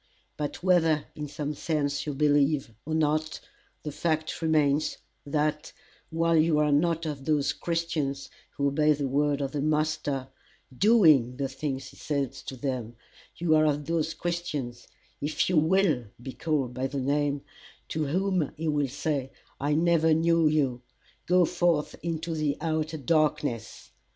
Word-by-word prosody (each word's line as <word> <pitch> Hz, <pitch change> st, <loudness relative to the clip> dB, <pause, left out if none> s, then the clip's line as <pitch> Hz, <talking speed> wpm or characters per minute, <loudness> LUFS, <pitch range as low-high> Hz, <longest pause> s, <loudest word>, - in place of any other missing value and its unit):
But 150 Hz, +3 st, -4 dB
whether 165 Hz, -5 st, +3 dB
in 150 Hz, 0 st, -5 dB
some 150 Hz, +1 st, -4 dB
sense 145 Hz, -1 st, -2 dB
you 145 Hz, -, -2 dB
believe 145 Hz, -3 st, +2 dB
or 160 Hz, -, -1 dB
not, 155 Hz, 0 st, 0 dB, 0.4 s
the 150 Hz, -, -4 dB
fact 155 Hz, +1 st, -2 dB
remains, 155 Hz, -2 st, +2 dB, 0.3 s
that, 150 Hz, +1 st, -1 dB, 0.4 s
while 165 Hz, 0 st, +1 dB
you 160 Hz, -1 st, +4 dB
are 150 Hz, -1 st, +3 dB
not 165 Hz, +3 st, +2 dB
of 145 Hz, -3 st, -5 dB
those 145 Hz, -3 st, +1 dB
Christians 155 Hz, -5 st, -2 dB, 0.3 s
who 140 Hz, -, +1 dB
obey 150 Hz, +2 st, +3 dB
the 140 Hz, -1 st, -2 dB
word 145 Hz, +1 st, +1 dB
of 135 Hz, -1 st, -2 dB
the 145 Hz, -, -2 dB
master, 150 Hz, -3 st, -1 dB, 0.5 s
DOING 155 Hz, -, +5 dB
the 140 Hz, -1 st, -1 dB
things 135 Hz, 0 st, -4 dB
he 135 Hz, -, -17 dB
says 140 Hz, -4 st, -3 dB
to 130 Hz, -, -6 dB
them, 125 Hz, -4 st, -3 dB, 0.4 s
you 170 Hz, -2 st, +1 dB
are 155 Hz, 0 st, +5 dB
of 145 Hz, 0 st, 0 dB
those 165 Hz, 0 st, -1 dB
Christians, 155 Hz, -9 st, -4 dB, 0.3 s
if 150 Hz, +2 st, 0 dB
you 175 Hz, -, +2 dB
WILL 160 Hz, -5 st, +3 dB
be 130 Hz, +2 st, -7 dB
called 145 Hz, -6 st, -1 dB
by 130 Hz, +1 st, -2 dB
the 140 Hz, +1 st, -4 dB
name, 145 Hz, +1 st, 0 dB, 0.5 s
to 155 Hz, -1 st, -1 dB
whom 185 Hz, -1 st, 0 dB
he 160 Hz, +1 st, -3 dB
will 145 Hz, -2 st, +1 dB
say, 135 Hz, 0 st, -2 dB, 0.3 s
I 145 Hz, +2 st, +1 dB
never 160 Hz, -1 st, +3 dB
knew 165 Hz, 0 st, +3 dB
you: 135 Hz, -5 st, +1 dB, 0.5 s
go 180 Hz, 0 st, +5 dB
forth 175 Hz, -3 st, +1 dB
into 165 Hz, +1 st, -3 dB
the 150 Hz, -2 st, -1 dB
outer 160 Hz, -1 st, -1 dB
darkness. 140 Hz, -, -1 dB
150 Hz, 155 wpm, -27 LUFS, 140-160 Hz, 0.5 s, DOING